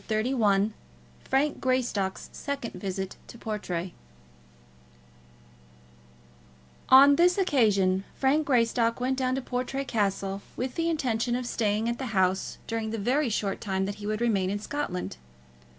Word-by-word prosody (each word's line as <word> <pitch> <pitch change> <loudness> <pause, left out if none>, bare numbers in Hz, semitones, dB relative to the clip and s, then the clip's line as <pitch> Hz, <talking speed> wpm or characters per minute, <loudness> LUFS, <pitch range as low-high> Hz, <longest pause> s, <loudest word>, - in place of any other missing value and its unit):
CHAPTER 215 0 +1
XXXI 210 -4 +2 0.5
Frank 280 +2 +1
Greystock's 245 -7 -1
Second 280 -5 -4
Visit 190 -1 -4
to - - -11
Portray 185 -6 -4 3.0
On 280 +2 +8
this 355 +2 +4
occasion 205 - +3
Frank 285 +3 +2
Greystock 230 -2 +2
went 255 +2 0
down 255 0 +1
to 265 - -3
Portray 255 +2 -3
Castle 195 -3 -1
with 255 0 -3
the 335 0 0
intention 245 -6 0
of 250 0 -2
staying 220 -2 0
at 235 0 -2
the 265 - -3
house 185 0 +1
during 225 -1 -3
the 225 - -3
very 250 +6 +1
short 205 -2 -2
time 190 -1 -1
that 200 +1 -4
he 205 - -5
would 215 +1 -2
remain 200 -6 +1
in 205 - -1
Scotland. 205 - -4
230 Hz, 140 wpm, -27 LUFS, 200-265 Hz, 3.0 s, On